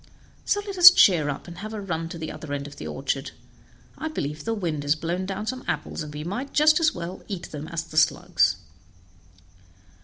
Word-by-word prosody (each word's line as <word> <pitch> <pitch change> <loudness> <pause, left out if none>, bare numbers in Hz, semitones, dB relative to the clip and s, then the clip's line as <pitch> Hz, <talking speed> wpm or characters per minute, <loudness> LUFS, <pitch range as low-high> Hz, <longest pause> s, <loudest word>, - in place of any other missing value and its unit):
So 410 - +1
let 395 -3 -6
us 355 0 +13
cheer 175 - +4
up, 140 - -5
and 175 0 -10
have 215 +2 -6
a - - -4
run 165 -4 -3
to 170 - -7
the 160 -1 -5
other 150 -3 -7
end 140 0 -3
of 145 0 -10
the - - -7
orchard; 135 +1 -3 0.7
I 315 - -3
believe 150 - -4
the 225 0 -1
wind 165 -8 -2
has 145 +1 +2
blown 175 +4 -3
down 195 +2 -4
some 255 +3 -4
apples, - - -3
and 150 -1 -6
we 150 0 -6
might 205 - -5
just 310 +2 +5
as 320 -2 +3
well 175 +1 -6
eat 185 -4 -6
them 150 0 -6
as 165 -1 -3
the 160 -2 -10
slugs." 90 - +3
170 Hz, 215 wpm, -25 LUFS, 150-215 Hz, 0.7 s, us